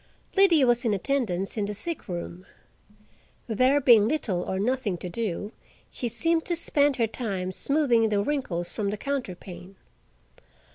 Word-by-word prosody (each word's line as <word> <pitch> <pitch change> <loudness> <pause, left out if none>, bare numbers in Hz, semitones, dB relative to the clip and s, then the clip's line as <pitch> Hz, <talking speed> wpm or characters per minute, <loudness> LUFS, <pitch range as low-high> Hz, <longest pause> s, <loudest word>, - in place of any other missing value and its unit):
Liddy 370 -7 +5
was 240 -1 +3
in 220 -4 +1
attendance 200 -5 -1
in 210 - 0
the 205 +1 -4
sick 330 - -5
room. 175 0 -6 1.0
There 255 +5 +3
being 235 -6 +6
little 225 - -1
or 190 - -3
nothing 220 -2 -1
to 180 - -6
do, 205 0 -3 0.4
she 245 - -3
seemed 325 +8 +1
to 345 - +1
spend 290 -4 +1
her 235 - +2
time 200 -5 -4
smoothing 240 -1 +2
the 205 -1 +1
wrinkles 200 -11 -2
from 205 -3 -2
the 210 - -3
counterpane. 195 -8 -6
225 Hz, 150 wpm, -26 LUFS, 195-275 Hz, 1.0 s, being